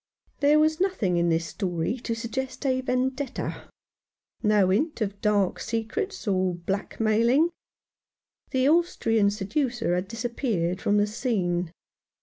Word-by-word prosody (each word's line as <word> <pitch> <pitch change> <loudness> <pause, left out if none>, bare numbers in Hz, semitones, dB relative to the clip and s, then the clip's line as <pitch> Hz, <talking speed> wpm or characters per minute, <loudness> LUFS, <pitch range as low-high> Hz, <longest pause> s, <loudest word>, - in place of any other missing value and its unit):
u - - -43
There 295 +1 +5
was 310 +1 +2
nothing 220 - +1
in 170 0 +2
this 165 0 +1
story 180 +4 -2
to 230 -1 -3
suggest 260 +4 -4
a 260 -1 +2
vendetta; 260 +1 -2 0.7
no 210 -4 +3
hint 295 - 0
of 200 -2 -3
dark 205 -3 +2
secrets 235 - -3
or 185 -2 +1
of 170 0 -11
black 195 +1 -3
mailing. 235 +9 +3 1.0
The 260 0 +2
Austrian 230 - +3
seducer 230 - -1
had 180 +2 -1
disappeared 225 -6 -2
from 205 - +2
the 205 - +4
scene. 185 -7 -1
225 Hz, 135 wpm, -26 LUFS, 195-260 Hz, 1.0 s, There